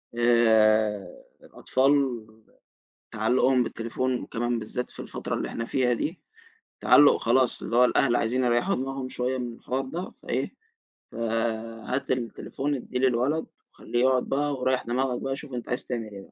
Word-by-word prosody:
آآ، 110 Hz, -3 st, +4 dB, 0.4 s
الأطفال 135 Hz, -2 st, +1 dB, 0.9 s
تعلُّقهم 125 Hz, +3 st, +2 dB
بالتليفون 120 Hz, +2 st, -2 dB
وكمان 120 Hz, 0 st, -2 dB
بالذات 125 Hz, +3 st, -4 dB
في -, -, -14 dB
الفترة -, -, -4 dB
اللي -, -, -2 dB
إحنا 115 Hz, -, -4 dB
فيها 125 Hz, 0 st, +1 dB
دي 155 Hz, +9 st, -3 dB, 0.6 s
تعلّق 145 Hz, 0 st, +6 dB
خلاص، 125 Hz, +2 st, +2 dB
اللي 115 Hz, -, -2 dB
هو 125 Hz, -, +7 dB
الأهل 125 Hz, 0 st, +3 dB
عايزين 125 Hz, +3 st, 0 dB
يريحوا 120 Hz, +11 st, +2 dB
دماغهم 135 Hz, 0 st, -3 dB
شوية 130 Hz, +1 st, -2 dB
من 120 Hz, -2 st, -4 dB
الحوار 130 Hz, +3 st, -3 dB
ده، 170 Hz, +8 st, -5 dB
فإيه -, -, -2 dB, 0.6 s
فهات 115 Hz, +2 st, -2 dB
التليفون 130 Hz, +3 st, -2 dB
ادّيه 125 Hz, -1 st, -4 dB
للولد، 130 Hz, +5 st, +1 dB, 0.3 s
وخليه 120 Hz, -, -3 dB
يقعد 130 Hz, 0 st, +3 dB
بقى 145 Hz, +1 st, 0 dB
وريّح 130 Hz, 0 st, 0 dB
دماغك 125 Hz, +1 st, -1 dB
بقى 135 Hz, 0 st, -2 dB
شوف 135 Hz, -1 st, -10 dB
أنت 120 Hz, -1 st, -5 dB
عايز 125 Hz, -, -2 dB
تعمل 115 Hz, -3 st, -4 dB
إيه 100 Hz, -, -8 dB
بقى، -, -, -17 dB
125 Hz, 150 wpm, -26 LUFS, 115-130 Hz, 0.9 s, هو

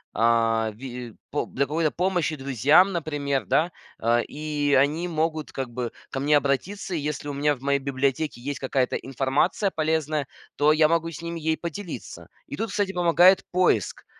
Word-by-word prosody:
а, 115 Hz, -1 st, +2 dB
ви 125 Hz, -1 st, -8 dB, 0.2 s
по 145 Hz, -, -1 dB
для 140 Hz, -, -1 dB
какой-то 155 Hz, +2 st, 0 dB
помощи 175 Hz, -4 st, 0 dB
друзьям, 140 Hz, -, +4 dB
например, 145 Hz, -6 st, -2 dB
да. 165 Hz, -, +2 dB, 0.3 s
Э, 120 Hz, +1 st, +2 dB
и 145 Hz, -1 st, -2 dB
они 150 Hz, +6 st, +2 dB
могут, 160 Hz, -1 st, -1 dB
как 135 Hz, -2 st, -4 dB
бы, 120 Hz, -1 st, -4 dB, 0.2 s
ко 135 Hz, -, -3 dB
мне 145 Hz, +1 st, +4 dB
обратиться. 175 Hz, +8 st, -2 dB
Если 150 Hz, -1 st, -3 dB
у 145 Hz, -, -3 dB
меня 145 Hz, +1 st, +1 dB
в 125 Hz, -, -18 dB
моей 140 Hz, 0 st, +1 dB
библиотеке 140 Hz, +1 st, -1 dB
есть 140 Hz, +2 st, -4 dB
какая-то 130 Hz, -1 st, 0 dB
информация 135 Hz, -, 0 dB
полезная, 155 Hz, -3 st, -1 dB, 0.3 s
то 145 Hz, +1 st, +4 dB
я 155 Hz, 0 st, +5 dB
могу 165 Hz, 0 st, +1 dB
с 165 Hz, -, -8 dB
ними 170 Hz, 0 st, -5 dB
ей 160 Hz, 0 st, 0 dB
поделиться. 170 Hz, +2 st, -7 dB, 0.2 s
И -, -, -6 dB
тут, 225 Hz, -, -3 dB
кстати, 195 Hz, -1 st, -1 dB
помогает 175 Hz, +2 st, +5 dB
поиск. 180 Hz, -, +1 dB
145 Hz, 170 wpm, -25 LUFS, 135-165 Hz, 0.3 s, я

